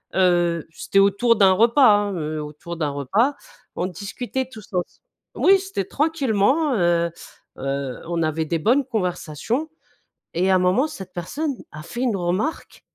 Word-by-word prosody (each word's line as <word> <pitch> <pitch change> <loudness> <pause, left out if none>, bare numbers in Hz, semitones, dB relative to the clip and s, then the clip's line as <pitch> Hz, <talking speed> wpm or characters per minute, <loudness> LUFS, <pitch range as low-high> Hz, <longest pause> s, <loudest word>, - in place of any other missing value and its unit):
heu, 175 -3 +2
c'était 195 +4 0
autour 200 +4 +4
d'un 195 -3 +6
repas 235 +7 +5
hein, 205 -2 -1
heu, 155 -1 -3
autour 155 +3 -8
d'un 150 -3 -1
repas. 200 - +1 0.4
On 180 - -1
discutait 245 +7 -4
tous 220 -4 -13
ens 180 -1 +1 0.5
oui, 390 0 +5
c'était 385 - -3
tranquillement, 280 0 +1
heu 170 -2 +2 0.5
heu, 135 -1 -3
on 170 -1 -1
avait 155 0 -1
des 165 +1 -1
bonnes 250 - +3
conversations 190 - -2 0.7
et 185 +2 +2
à - - +5
un - - +4
moment 185 +10 +3
cette 190 - -9
personne 280 - -3 0.2
a 155 - -9
fait 240 +8 -6
une 240 -5 +1
remarque 185 - -2
190 Hz, 160 wpm, -22 LUFS, 170-245 Hz, 0.7 s, d'un